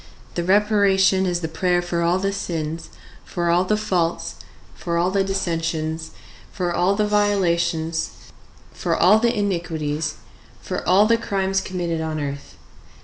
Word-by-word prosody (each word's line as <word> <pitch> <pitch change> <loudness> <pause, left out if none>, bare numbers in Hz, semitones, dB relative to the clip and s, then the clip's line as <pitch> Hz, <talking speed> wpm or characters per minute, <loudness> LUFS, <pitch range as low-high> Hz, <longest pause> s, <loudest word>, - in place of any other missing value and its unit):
The 175 - -2
reparation 195 -1 +3
is 175 -1 -1
the 160 - -2
prayer 175 +2 +1
for 175 -1 -2
all 170 +2 +2
the 195 +1 -1
sins, 165 -4 -4 0.3
for 170 -1 -1
all 175 +2 +3
the 210 +3 +1
faults, 180 -5 -1 0.4
for 170 -1 -3
all 175 +2 +2
the 195 0 +2
dissensions, 165 -4 -2 0.4
for 180 -3 -2
all 185 +3 +2
the 210 +1 +1
violations, 170 -6 +1 0.6
for - - -1
all 200 +5 +6
the 235 0 +1
iniquities, 160 -6 -2 0.4
for - - -4
all 195 +3 +6
the 230 +1 +4
crimes 195 -3 -1
committed 170 -3 -3
on 160 -1 -3
earth. 140 -1 -6
175 Hz, 145 wpm, -22 LUFS, 165-195 Hz, 0.6 s, all